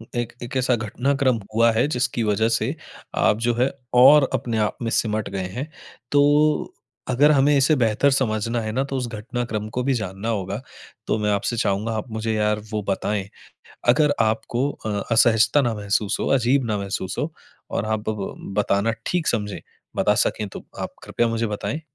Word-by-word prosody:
एक 120 -1 -2
एक 120 - -7
ऐसा 125 -1 +2
घटनाक्रम 125 +3 0 0.2
हुआ 115 +1 +5
है 115 +5 +2
जिसकी 125 -4 -1
वजह 110 +1 +2
से - - 0 0.4
आप 105 - +3
जो 120 - +3
है 125 +3 +1 0.2
और 135 +3 +7
अपने 120 -3 -1
आप 105 -1 0
में 115 - -1
सिमट 110 -2 0
गए 95 -2 -3
हैं। 140 +5 -4 0.4
तो 145 +1 +3 0.4
अगर 140 +4 +5
हमें 145 0 +4
इसे 140 +3 +4
बेहतर 120 +1 +2
समझना 115 -3 0
है 110 -1 -3
न 130 +5 0
तो 135 - -3
उस 125 -2 -2
घटनाक्रम 115 -1 -4
को 125 - +1
भी 135 +1 +1
जानना 105 -2 -3
होगा। 100 0 -2 0.5
तो - - +1
मैं 105 0 0
आपसे 100 +4 -1
चाहूँगा 105 +1 0
आप 110 - -5
मुझे 110 0 -2
यार 105 0 +1
वो 105 -1 -1
बताएँ। 100 0 -1 0.6
अगर 145 +3 +4
आपको 115 +4 0
अ, 105 -6 -4
असहजता 115 +4 +4
ना 120 -3 0
महसूस 105 -1 0
हो, - - -1
अजीब 130 +1 +3
ना 105 -2 -1
महसूस 100 -2 -4
हो 155 - -2 0.4
और - - -1
आप 110 0 -2
ब 105 -3 -3 0.2
बताना 100 +1 +2 0.2
ठीक 175 -2 0
समझें। 105 -3 -1 0.4
बता - - +3
सके 105 - 0
तो - - -8 0.2
आप - - -5
कृपया 120 - 0
मुझे 115 0 -1
बताएँ। 105 +8 -3
115 Hz, 185 wpm, -23 LUFS, 105-130 Hz, 0.6 s, और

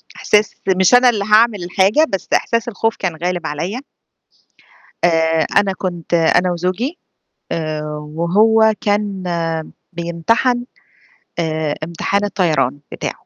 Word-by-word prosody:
إحساس 210 0 +1 0.2
مش 190 +4 +4
أنا 245 0 +7
اللي 210 -4 -1
هاعمل 215 -2 +3
الحاجة 195 - +3
بس 195 - -4
إحساس 230 0 +1
الخوف 225 0 -1
كان 180 -4 -3
غالب 175 -2 -2
عليّا. 170 - -4 1.2
آآ، 160 -1 +2
أنا 195 -1 +3
كنت 175 -3 -5
أنا 170 +2 +3
وزوجي 185 - -2 0.5
آآ، 155 -2 -2 0.3
وهو 220 +6 +3
كان 205 -2 -1 0.7
بيمتحن 200 +9 0 0.7
آآ، 155 -2 -1
امتحان 170 +5 -1
الطيران 160 -9 0
بتاعه. - - -4
185 Hz, 115 wpm, -18 LUFS, 170-215 Hz, 1.2 s, أنا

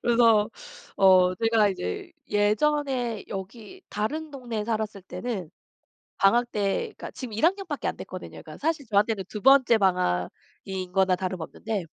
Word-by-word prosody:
그래서 230 -3 +4 0.5
어 185 -1 +6
제가 225 +1 +3
이제 345 - -4 0.2
예전에 245 +3 +1
여기 220 - -8
다른 300 +10 -3
동네에 240 -6 -4
살았을 215 -3 -3
때는 195 -4 -5 0.7
방학 235 +5 +3
때 200 -2 0 0.2
그러니까 - - -7
지금 250 -5 -7
1 225 +9 +2
학년밖에 390 +2 -1
안 - - -1
됐거든요. - - -8
그러니까 - - -11
사실 310 -2 -1
저한테는 205 -1 +1
2 210 - -6
번째 260 -2 +6
방학인 185 - -2
거나 190 -1 +3
다름없는데 185 +2 -4
215 Hz, 315 characters per minute, -26 LUFS, 195-245 Hz, 0.7 s, 어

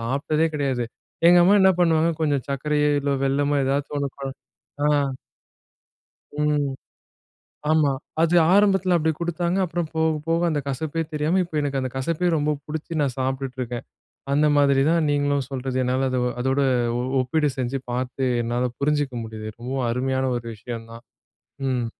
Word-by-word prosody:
சாப்பிட்டதே 140 +7 0
கெடையாது. 135 -4 0 0.4
எங்க 175 - +7
அம்மா 200 +3 +6
என்னா 190 0 +6
பண்ணுவாங்க, 165 -1 +3
கொஞ்சம் 145 -4 +1
சர்க்கரையோ, 150 +2 +1
இல்ல 140 0 -1
வெல்லமோ 145 +1 +1
ஏதாச்சும் 140 +2 -1
ஒண்ணு 140 -1 -2
கல 135 -1 -3 0.5
ஆ. - - +4 1.5
ம். 150 -2 +1 1.0
ஆமா. 155 -3 +3 0.3
அது 165 +1 +3 0.2
ஆரம்பத்தில 195 -3 +4
அப்படி 160 -1 +1
குடுத்தாங்க, 175 +1 -1
அப்புறம் 175 0 -2
போக 160 -1 +1
போக 165 +1 +1
அந்த 150 -2 0
கசப்பே 155 +4 -2
தெரியாம, 155 +4 +1
இப்ப 170 - -14
எனக்கு 140 -2 -1
அந்த 130 -1 -3
கசப்பே 165 +6 0
ரொம்ப 150 0 +1
புடிச்சு 160 +1 -5
நான் 135 -3 -1
சாப்பிட்டுட்டு 130 0 -2
இருக்கேன். 120 -1 -4 0.5
அந்த 150 +2 +3
மாதிரி 140 -1 +4
தான் 165 -2 +2
நீங்களும் 145 -2 +1
சொல்றது, 130 -1 -3
என்னால 130 +1 +1
அது 130 -1 0 0.2
அதோட 130 +2 +1 0.4
ஒ - - -1 0.2
ஒப்பீடு 145 +4 +1
செஞ்சு 130 +1 -2
பாத்து, 130 +2 -2 0.2
என்னால 120 +2 -1
புரிஞ்சுக்க 145 -2 0
முடியுது, 110 -1 -7
ரொம்பவும் 125 +1 -2
அருமையான 130 +2 0
ஒரு 120 -1 -6
விஷயம் 115 +1 -7
தான். 115 +1 -11 0.6
ம் 125 -2 0
140 Hz, 155 wpm, -23 LUFS, 130-160 Hz, 1.5 s, எங்க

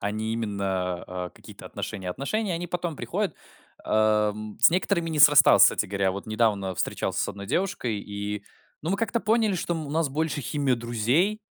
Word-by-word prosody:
а 100 - -1
не 110 +1 -3
именно, 100 -5 -2
а, 90 -1 -5
какие-то - - -14
отношения. 95 -2 -5
Отношения, 185 - -2
они 175 +1 -4
потом 175 -3 -3
приходят, 195 -4 -2 0.5
ам, 105 -1 +1
с - - +8
некоторыми 170 -1 0
не 155 -2 0
срасталось, 145 -1 +8
кстати - - +5
говоря. 100 0 0
Вот 100 +1 -6
недавно 105 -4 0
встречался - - -2
с - - -1
1 100 0 -7
девушкой, 135 - -1
и 105 0 -5 0.4
ну 160 - -2
мы 195 - +1
как-то 230 +1 -1
поняли, 220 -2 +2
что 175 -1 -2
мы 160 -2 -4
у 140 - -7
нас 160 -1 +1
больше 150 +1 -2
химия 140 0 0
друзей, 120 - 0
120 Hz, 180 wpm, -26 LUFS, 105-170 Hz, 0.5 s, с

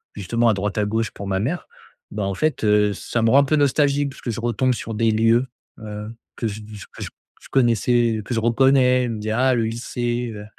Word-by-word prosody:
justement 115 +4 +1
à - - +4
droite 100 +2 -3
à 105 - +1
gauche 110 +1 -1
pour 100 - -8
ma 95 -1 0
mère, 140 - -3 0.4
bah, 105 0 -3
en 100 0 -1
fait, 155 +3 -1
heu, 105 0 +3
ça 120 - -3
me 115 - +3
rend 135 - +6
un - - +5
peu 155 - +1
nostalgique. 145 0 +2
Parce - - -14
que 120 - -3
je 115 - -5
retombe 120 +2 +1
sur 115 0 -6
des 115 +1 +2
lieux, 115 +3 +3 0.3
heu, 105 0 -7 0.3
que 115 - -2
je 105 0 -6
je 105 - -9
que - - -7
je - - -14
connaissais, 120 -2 +2
que - - -4
je 115 - +1
reconnais, 125 +2 +3
je - - -3
me 110 -2 -4
dit: 110 +1 -3
«Ah 130 +4 +2
le 115 - +1
lycée, 120 +1 -3
heu, 105 0 -8
115 Hz, 240 wpm, -22 LUFS, 105-125 Hz, 0.4 s, rend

